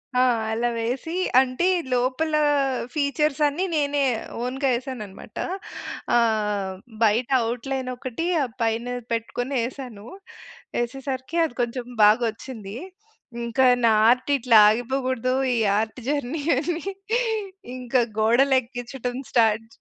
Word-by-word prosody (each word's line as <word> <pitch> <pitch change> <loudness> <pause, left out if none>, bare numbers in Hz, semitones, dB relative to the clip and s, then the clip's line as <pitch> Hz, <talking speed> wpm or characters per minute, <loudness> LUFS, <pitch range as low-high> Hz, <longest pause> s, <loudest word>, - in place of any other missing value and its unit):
ఆ! 250 - +4 0.3
అలా 235 +2 0
వేసి, 250 +8 -3 0.3
అంటే 260 +6 +1 0.3
లోపల 260 +6 0 0.6
ఫీచర్స్ 295 0 0
అన్ని 320 +7 -1
నేనే 285 -1 +1 0.4
ఓన్‌గా 265 +2 -1
వేసానన్నమాట. 235 -6 -6 0.8
ఆహ్, 210 -4 0 0.3
బయట 230 +4 +2 0.2
ఔట్‌లైన్ 260 +1 -3
ఒకటి 255 +6 -4 0.4
పైన 225 +1 0 0.3
పెట్టుకొని 245 +3 -2
ఏసాను. 245 -5 -8 0.8
ఏసేసరికి 265 +5 -4
అది 270 - -6
కొంచెం 240 +1 -2 0.2
బాగొచ్చింది. 225 -1 +1 0.7
ఇంకా 235 +3 +1 0.2
నా 225 - +5 0.2
ఆర్ట్ 255 +3 +2
ఇట్లా 240 -3 +4
ఆగిపోకూడదు, 255 +2 -1 0.2
ఈ - - 0 0.2
ఆర్ట్ 220 +3 -3
జర్నీ 290 +1 -1 0.2
అని 330 +3 -2 0.9
ఇంకా 250 0 +1 0.2
గోడలు 250 +5 +4
ఎక్కించడం 245 0 -6 0.2
స్టార్ట్ 225 -2 +3
250 Hz, 105 wpm, -24 LUFS, 230-270 Hz, 0.9 s, నా